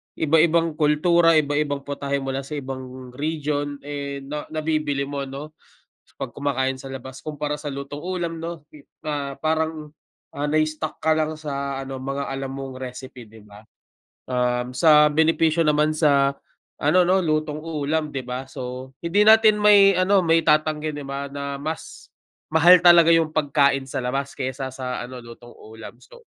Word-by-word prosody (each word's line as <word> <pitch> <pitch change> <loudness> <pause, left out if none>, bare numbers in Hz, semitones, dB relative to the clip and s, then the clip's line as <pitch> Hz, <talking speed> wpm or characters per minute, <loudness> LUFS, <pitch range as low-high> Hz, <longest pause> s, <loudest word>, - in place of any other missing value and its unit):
iba-ibang 165 +1 +2
kultura, 165 +2 +4
iba-ibang 145 -1 0
putahe 140 -1 -3
mula 135 0 -3
sa 140 +2 -7
ibang 130 -2 -7
region, 145 0 -3
eh, 140 -1 -5
na 150 +2 -6
nabibili 155 -3 -1
mo 140 -1 -4
no 140 +3 -8 0.7
'pag - - -5
kumakain 135 -2 -1
sa 135 - -9
labas 130 0 -9
kumpara 150 -1 -3
sa 145 - -4
lutong 140 +2 -7
ulam 175 -2 -3
no, 170 -3 -6 0.4
ah, 140 -2 -3
parang, 160 -1 -1 0.5
ah, 145 - -3
na-stuck 155 0 -1
ka 160 0 +2
lang 155 0 -1
sa 140 -2 -4
ano 135 0 -6
mga 140 +1 -3
alam 135 0 -4
mong 135 -1 -7
recipe, 125 0 -8
di 110 0 -15
ba? 105 +1 -15 0.7
Um, 125 0 -1
sa 150 -1 +6
benepisyo 160 +1 +2
naman 150 +1 +2
sa 140 -3 +3 0.5
ano 155 +6 +4
no, 185 +1 +3
lutong 155 -1 -1
ulam 155 -1 -2
di 135 - -3
ba, 125 +1 -4
so 130 0 -7
hindi 175 +5 +2
natin 220 -1 +6
may 200 -2 +7
ano 190 +1 +3
maitatanggi, 155 -1 +2
di 145 - -6
ba, 140 +1 -5
na 140 0 -4
mas 155 +2 -7 0.4
mahal 175 +3 +8
talaga 170 -1 +7
yung 165 -1 +2
pagkain 140 -3 +2
sa 130 - -3
labas 135 +2 -3
kaysa 130 0 -4
sa 125 -1 -4
ano 130 +1 -9
lutong 120 +1 -13
ulam. 110 0 -12
So - - -17
145 Hz, 155 wpm, -23 LUFS, 135-155 Hz, 0.7 s, mahal